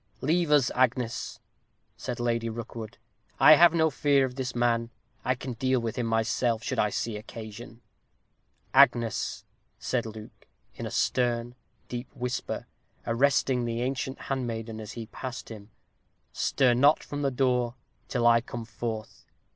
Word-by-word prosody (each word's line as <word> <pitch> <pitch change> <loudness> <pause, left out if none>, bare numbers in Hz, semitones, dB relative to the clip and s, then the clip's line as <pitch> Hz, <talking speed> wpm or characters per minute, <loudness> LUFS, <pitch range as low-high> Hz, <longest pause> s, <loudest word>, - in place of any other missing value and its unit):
"Leave 165 +3 +1
us, 145 -4 +4
Agnes," 125 -2 0 0.6
said 125 -1 -5
Lady 115 -1 0
Rookwood. 115 -1 -7 0.4
"I - - +9
have 170 +2 +7
no 160 -1 +2
fear 140 -1 +3
of 130 - -5
this 130 -1 -4
man. 115 -1 +1 0.3
I 130 - +1
can 130 0 -6
deal 130 +2 +1
with 115 -2 -3
him 120 -2 -1
myself, 115 +1 +1
should - - -2
I 105 - +3
see 110 +1 -3
occasion." 115 +2 -9 0.9
"Agnes," 120 -4 +3 0.3
said 120 -3 -1
Luke, 110 -1 -11 0.3
in - - -5
a - - -5
stern, 120 -1 0 0.3
deep 120 +1 -5
whisper, 125 0 -3 0.4
arresting 130 +1 +2
the 115 0 -2
ancient 130 +1 -3
handmaiden 115 -4 -3
as 105 -1 -7
she 115 -1 -6
passed 125 +3 -7
him, 105 -2 -10 0.6
"stir 130 -3 +2
not 140 +5 +4
from 145 0 -5
the 140 - +2
door 125 -2 +1 0.3
till 120 -3 -1
I 115 0 +6
come 120 -1 -7
forth. 110 0 -6
120 Hz, 145 wpm, -28 LUFS, 115-130 Hz, 0.9 s, I